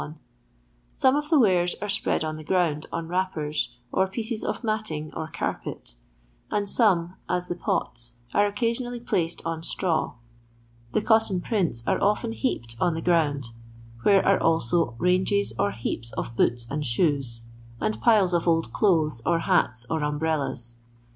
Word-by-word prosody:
Some 260 +1 +4
of 295 0 -2
the 320 - +5
wares 180 -8 +3
are 210 - -4
spread 200 -5 0
on 155 0 -3
the 155 - -8
ground 160 -3 0
on 165 -1 -3
wrappers, 165 -4 -1 0.2
or 190 - +2
pieces 220 +3 -3
of - - -3
matting 215 -9 -3
or 160 - -3
carpet; - - -4 0.6
and 205 -1 -1
some, 185 -6 +2 0.2
as 180 0 0
the - - -2
poU, 175 - 0 0.5
are 205 0 +4
occasionally 235 +4 -2
placed 170 -7 -2
on 165 -1 -2
straw. 165 -1 -1 0.8
The 210 - +1
cotton 220 -5 +3
prints 175 - -1
are - - +1
often 210 +3 +1
heaped 120 - -2
on 170 - +2
the 165 - -3
ground; 145 -8 +1 0.5
where 195 - +4
are 195 - +4
also 160 -4 +1
ranges 185 - +1
or 100 - +3
heaps 115 +2 -4
of 115 - -4
boots 120 0 +2
and 150 +1 -2
shoes, 130 -3 0 0.4
and 215 - -2
piles 205 -6 +4
of 175 0 +1
old 165 -1 +1
clothes, 160 - +2
or 170 - +2
hats, 120 - +1
or 160 +2 -1
umbrellas. 150 -6 -1
170 Hz, 155 wpm, -26 LUFS, 150-205 Hz, 0.8 s, the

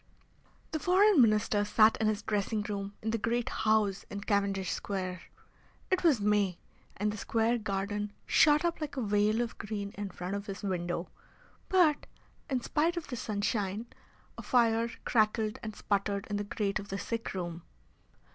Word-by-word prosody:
The 315 - -1
Foreign 375 0 +5
Minister 215 -2 +3
sat 215 +1 +5
in 220 - +1
his 210 -1 0
dressing 210 0 -1
room 200 -1 -4
in 220 - 0
the 230 - -1
great 235 +2 0
house 215 -3 +1
in 200 0 -5
Cavendish 200 -2 0
Square. 185 -2 -3 0.7
It 375 - +2
was 305 -9 +4
May, 205 -3 +2 0.4
and 210 +1 0
the - - -6
square 230 +3 +1
garden 205 0 -2
shot 300 +2 +5
up 340 -1 -1
like 290 -2 -4
a - - 0
veil 210 +2 +2
of 235 -1 -4
green 205 -1 -4
in 205 -1 -5
front 180 +1 -5
of 200 +1 -4
his 195 +1 -6
window, 175 -2 -2 0.6
but, 340 -6 +3 0.4
in 260 -3 0
spite 330 +7 0
of 340 - -5
the 250 - -3
sunshine, 210 -1 -2 0.5
a - - -4
fire 230 -2 +2 0.2
crackled 215 -1 +1
and 215 -1 -6
sputtered 200 -1 -1
in 205 - 0
the 205 - -3
grate 200 0 -1
of 200 -1 -9
the 195 - -3
sick 230 -1 -4
room. 175 -2 -4
210 Hz, 170 wpm, -31 LUFS, 200-230 Hz, 0.7 s, Foreign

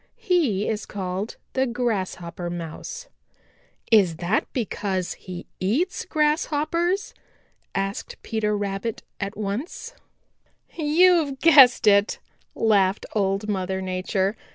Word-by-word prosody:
He 340 - +1
is 215 -1 -2
called 190 +1 -4 0.2
the 265 0 +1
Grasshopper 190 -8 -3
Mouse." 175 - -6 0.8
"Is 195 -7 +5
that 175 +6 -1
because 195 -6 -2
he 180 -2 -9
eats 265 - 0
Grasshoppers?" 310 +4 0 0.6
asked 195 +1 -3
Peter 210 -2 -1
Rabbit 200 +2 -3 0.2
at 200 +1 -4
once. 235 - -4 0.8
"You've 320 -2 +3
guessed 275 -8 +7
it," 200 0 +4 0.4
laughed 200 -3 +2
Old 195 0 0
Mother 190 -2 -1
Nature. 190 +2 -1
210 Hz, 100 wpm, -24 LUFS, 190-295 Hz, 0.8 s, guessed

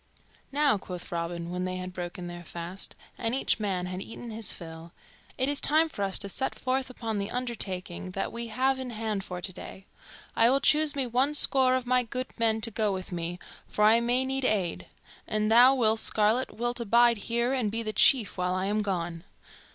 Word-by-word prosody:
"Now," 285 -6 +2
quoth 180 -2 -8
Robin, 170 0 -4
when 180 0 -3
they 185 0 -3
had 185 0 -6
broken 175 0 -6
their 175 0 -7
fast, 170 +3 -6 0.2
and 230 +1 -1
each 265 - +1
man 190 -4 -1
had 185 +1 -5
eaten 230 +2 -8
his 220 -2 -3
fill, 165 0 -9 0.4
"it 260 - +1
is 285 0 +2
time 315 +2 +5
for 205 - -7
us 195 -1 0
to - - -1
set 265 +7 -2
forth 260 0 -1
upon 225 -4 -4
the 200 +1 -3
undertaking 190 -8 -3
that 195 - -2
we 235 0 -3
have 260 +4 +1
in 260 -1 -5
hand 215 -3 -3
for 180 -1 -6
today. 190 +1 -7 0.5
I 230 +1 +5
will 270 +2 +3
choose 305 +1 +3
me 275 -2 0
one 255 +5 +1
score 260 -2 +5
of 255 -1 -2
my 250 0 +3
good 250 +2 -4
men 225 -1 +2
to 230 - -2
go 215 -1 0
with 185 -1 -5
me, 175 0 -3 0.3
for 210 - -1
I 225 +2 +6
may 245 +2 +1
need 270 0 -1
aid; 200 -8 0 0.4
and 215 0 0
thou, 250 +4 +7
Will 225 -3 +2
Scarlet, 220 +4 +1
wilt 240 +2 -2
abide 235 +1 +4
here 235 +2 +1
and 250 -6 0
be 230 +1 -2
the 215 -1 -3
chief 225 -7 +3
while 180 0 0
I 185 +1 -1
am 210 +2 0
gone." 175 -4 -3
220 Hz, 205 wpm, -28 LUFS, 185-250 Hz, 0.5 s, thou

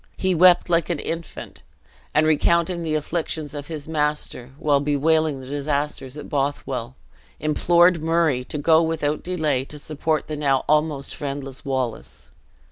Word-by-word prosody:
He 190 -1 +1
wept 180 +1 +6
like 170 -1 +1
an 170 - 0
infant; 165 +2 -6 0.5
and 155 +1 +4
recounting 170 +3 +2
the 160 -2 -1
afflictions 155 -1 -3
of 145 -1 -6
his 155 -3 -5
master, 150 -5 -1
while 145 -2 +2
bewailing 150 +1 +1
the - - -10
disasters 140 -1 -3
at 150 - -8
Bothwell, 135 -3 -2 0.4
implored 170 +3 +3
Murray 160 -5 +1
to 150 - -5
go 160 +2 +4
without 155 -2 -1
delay 155 -7 0
to 150 - -9
support 155 +1 -2
the 155 - -5
now 140 -3 +1
almost 150 -2 +1
friendless 140 -3 -5
Wallace. 130 -4 -4
150 Hz, 145 wpm, -23 LUFS, 140-160 Hz, 0.5 s, wept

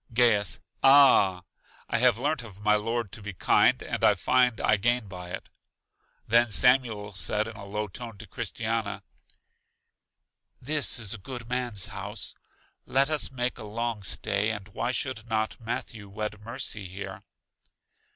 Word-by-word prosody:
Gaius: 105 -7 +3 0.2
Ah! 130 -10 +6 0.4
I 115 - 0
have 125 -2 +4
learnt 145 +3 -1
of 105 -3 -12
my 105 0 +4
Lord 115 0 -1
to 115 - -8
be 105 0 -6
kind, - - +3
and - - -4
I - - +6
find 125 -2 +2
I 105 - +3
gain 120 +2 +1
by 90 -2 -8
it. 95 - -6 0.8
Then 120 +2 +4
Samuel 110 -3 +2
said 105 +2 0
in 115 - -8
a 100 -1 -9
low 105 +1 -3
tone 115 +2 -8
to 110 - -10
Christiana, 115 0 -3 1.6
This 150 +2 +2
is 110 -2 +1
a 115 - -5
good 120 +3 -8
man's 120 -5 -1
house; - - -4 0.5
let 135 +3 +2
us 155 -2 +2
make 125 -1 -3
a - - -7
long 115 +1 -3
stay, 100 +2 0
and 105 -2 -5
why 120 +4 -2
should 120 -3 -3
not 110 0 -1
Matthew 115 -2 -5
wed 105 +1 -5
Mercy 115 -3 -4
here? 95 +2 -7
110 Hz, 155 wpm, -27 LUFS, 105-120 Hz, 1.6 s, Ah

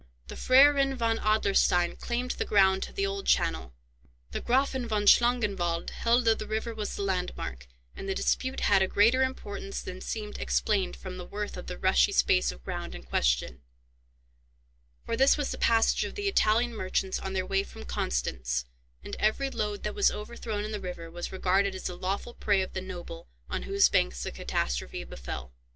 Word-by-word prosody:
The - - -7
Freiherren 275 +1 +5
von 230 -2 0
Adlerstein 200 -4 +2
claimed 245 +1 -3
the - - -2
ground 190 -2 +4
to - - -5
the 195 - -1
old 195 0 -4
channel, 65 0 +1 0.6
the - - -3
Graffen 260 0 +1
von 210 -2 0
Schlangenwald 200 -8 +3
held 235 +1 +2
that 225 -1 +3
the 215 - -5
river 220 +2 -2
was 215 -2 -4
the 200 - -3
landmark; 180 - -3 0.3
and 195 - -6
the 190 - -1
dispute 260 +1 -1
had 200 -2 +4
a 190 - +3
greater 230 +7 +4
importance 205 -6 -3
than 185 0 -7
seemed 210 -2 -5
explained 200 -4 0
from 185 -1 -8
the 180 - -7
worth 210 0 -5
of - - -8
the - - -5
rushy 65 -1 +3
space - - +3
of - - -14
ground - - -5
in - - -9
question, 60 0 0 1.4
for - - -1
this 270 +5 +5
was 290 -2 -2
the - - -4
passage 225 -1 +3
of - - -5
the 410 -1 -2
Italian 235 - +2
merchants 190 -1 -1
on 190 - -5
their 185 -1 -1
way 195 +1 +1
from 135 - -10
Constance, 60 0 -2 0.4
and - - -6
every 270 +6 +1
load 210 -3 -3
that 210 - -2
was - - +4
overthrown 210 -1 -5
in 215 - -5
the 210 -2 -4
river 170 -3 -7
was 175 +1 -5
regarded 190 +1 +1
as 185 - -7
the 180 - -3
lawful 195 +6 -3
prey 200 -4 +1
of 185 - -8
the 185 - -3
noble 175 -2 -8 0.2
on - - -2
whose 200 0 +5
banks - - +1
the - - -4
catastrophe - - -3
befell. 65 0 -7
200 Hz, 190 wpm, -28 LUFS, 180-225 Hz, 1.4 s, Freiherren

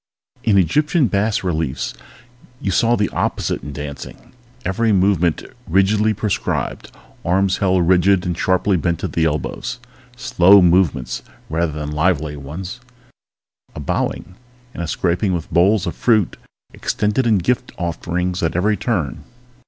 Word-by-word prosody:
In 105 -3 +3
Egyptian 150 - +2
bas 105 0 0
reliefs 80 -9 -2 0.7
you 100 - -2
saw 115 +6 +3
the 105 -2 +1
opposite - - -2
in 75 - -7
dancing. 70 -1 -8 0.3
Every 110 +5 +1
movement 90 -4 +2 0.2
rigidly 105 +4 +3
prescribed, 105 -1 -2 0.3
arms 95 +2 +2
held 95 -3 +2
rigid 95 +1 +4
and 90 -1 -1
sharply 95 +2 +1
bent 85 0 -1
at - - -3
the 80 - +1
elbows. 80 +10 -2 0.4
Slow 100 -5 +5
movements 85 -7 +2 0.3
rather 80 -1 0
than 75 0 -4
lively 75 -1 0
ones, 85 - -7 1.0
a - - -6
bowing 75 +5 -2 0.4
and - - -6
a 85 - -3
scraping 90 +4 0
with 85 -1 -6
bowls 95 +3 +3
of - - -3
fruit 110 -7 +2 0.4
extended 105 +4 0
in 110 -3 +4
gift 125 +7 -1
offerings 90 +1 -2
at 80 - -1
every 105 +4 +2
turn. 90 - -2
90 Hz, 135 wpm, -19 LUFS, 85-105 Hz, 1.0 s, Slow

